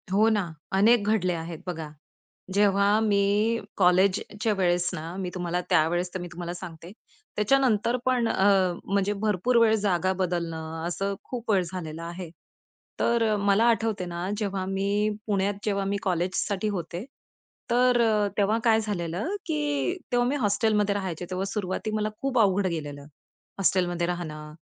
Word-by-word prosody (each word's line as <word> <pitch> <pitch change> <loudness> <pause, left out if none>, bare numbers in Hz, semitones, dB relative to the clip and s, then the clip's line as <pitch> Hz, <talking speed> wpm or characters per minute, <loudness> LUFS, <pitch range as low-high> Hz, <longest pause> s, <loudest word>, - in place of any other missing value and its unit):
हो 210 +3 +4
ना. 205 -6 0 0.2
अनेक 210 +3 +5
घडले 190 -4 +2
आहेत 165 -1 -5
बघा, 160 -3 -4 0.6
जेव्हा 200 +1 +3
मी 210 +2 +2 0.2
कॉलेजच्या 195 +4 +2
वेळेस 175 -1 +2
ना, 165 +3 -6
मी 190 -2 -3
तुम्हाला 180 0 -1
त्यावेळेस 175 +3 +2
तर 185 - -3
मी 175 - -5
तुम्हाला 175 0 -5
सांगते. 170 0 -9 0.4
त्याच्यानंतर 235 +1 +2
पण 250 -2 +2
अ, 195 -2 +3 0.3
म्हणजे 200 +1 0
भरपूर 210 +3 +1
वेळ 220 -1 +5
जागा 190 -3 +1
बदलणं, 165 -2 -3
असं 195 +3 -2
खूप 240 -3 -4
वेळ 190 -3 +3
झालेला 165 -3 -6
आहे. 170 +1 -6 0.7
तर 230 -2 +2
मला 200 +2 +3
आठवते 225 -4 0
ना, 175 +1 -4
जेव्हा 200 -3 -2
मी 200 +2 0 0.2
पुण्यात 200 -1 +1
जेव्हा 200 -2 0
मी 200 +1 0
कॉलेजसाठी 185 +2 -1
होते. 175 +3 -5 0.6
तर 245 0 +4
अ, 215 -3 +3
तेव्हा 210 +2 +2
काय 225 -2 +4
झालेलं 205 - -3
की 300 +3 -1
तेव्हा 245 0 +2
मी 275 - 0
हॉस्टेलमध्ये 210 -3 +1
राहायचे. 185 -4 -3
तेव्हा 185 +1 -2
सुरुवाती 200 +1 -3
मला 215 0 0
खूप 270 -2 +1
अवघड 200 -2 +3
गेलेलं. 145 -4 -5 0.5
हॉस्टेलमध्ये 175 -2 +1
राहणं, 155 -4 -5
195 Hz, 145 wpm, -26 LUFS, 175-215 Hz, 0.7 s, अनेक